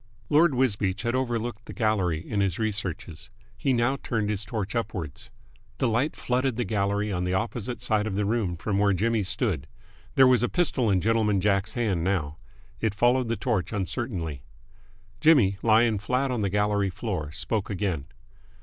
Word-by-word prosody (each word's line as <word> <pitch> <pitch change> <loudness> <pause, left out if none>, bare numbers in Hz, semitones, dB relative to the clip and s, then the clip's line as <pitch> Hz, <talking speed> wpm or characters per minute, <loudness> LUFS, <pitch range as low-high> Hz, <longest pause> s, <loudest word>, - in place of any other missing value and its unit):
Lord 150 -1 +5
Wisbeach 105 -6 0
had 120 0 0
overlooked 120 -3 -2
the - - -8
gallery 95 -9 0
in 105 - -1
his 95 -3 0
researches. 100 -6 -4 0.3
He 135 - 0
now 120 +2 +2
turned 110 -3 -1
his 105 0 -2
torch 110 -1 -4
upwards. 95 - -4 0.5
The 130 - +1
light 120 +7 0
flooded 130 0 0
the 120 - 0
gallery 100 -1 0
on 90 -1 -1
the 90 +1 0
opposite 115 +3 -3
side 110 -3 +1
of 100 - -3
the 105 0 0
room 105 -5 0
from 100 +3 -1
where 100 -1 +3
Jimmy 110 +4 +1
stood. 95 - -1 0.5
There 135 - +7
was 125 -3 +5
a 120 - +1
pistol 145 -10 +1
in 95 -2 +2
Gentleman 110 -1 +2
Jack's 100 +2 +1
hand 105 -9 0
now. 80 -6 -1 0.4
It 110 -3 -1
followed 120 +3 +3
the 115 - -1
torch 115 -9 -1
uncertainly. 95 - -3 0.8
Jimmy, 115 -12 +4
lying 110 -1 +4
flat 125 +6 0
on 120 -3 -1
the 100 - +1
gallery 105 0 +1
floor, 90 -6 -4
spoke 105 +5 -2
again. 95 -8 -2
105 Hz, 175 wpm, -26 LUFS, 95-120 Hz, 0.8 s, There